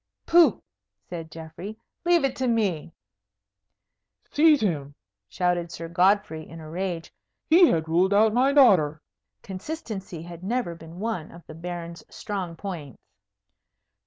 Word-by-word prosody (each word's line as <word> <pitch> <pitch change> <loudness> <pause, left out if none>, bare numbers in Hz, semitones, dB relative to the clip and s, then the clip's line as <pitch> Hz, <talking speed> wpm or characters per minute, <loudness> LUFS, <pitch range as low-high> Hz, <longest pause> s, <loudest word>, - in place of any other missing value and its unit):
"Pooh!" 330 - +5 0.4
said 165 - -7
Geoffrey, 165 +7 -9 0.3
"leave 345 -2 +4
it 270 -2 0
to 260 - 0
me." 200 -10 0 1.4
"Seize 300 -2 +5
him!" 145 -8 -2 0.3
shouted 175 -1 0
Sir 165 - -6
Godfrey 180 -1 +2
in 165 - -10
a 155 - -10
rage. 170 0 -4 0.3
"He 340 +2 +7
had 160 - +1
ruled 175 +4 +2
out 215 +2 +4
my 260 +4 +3
daughter." 185 - +5 0.4
Consistency 195 - -6
had 170 0 -10
never 230 -3 -1
been 165 0 -12
one 210 -7 -3
of 170 0 -14
the - - -10
Baron's 170 0 -7
strong 190 -5 -5
points. 165 - -7
180 Hz, 130 wpm, -25 LUFS, 165-220 Hz, 1.4 s, He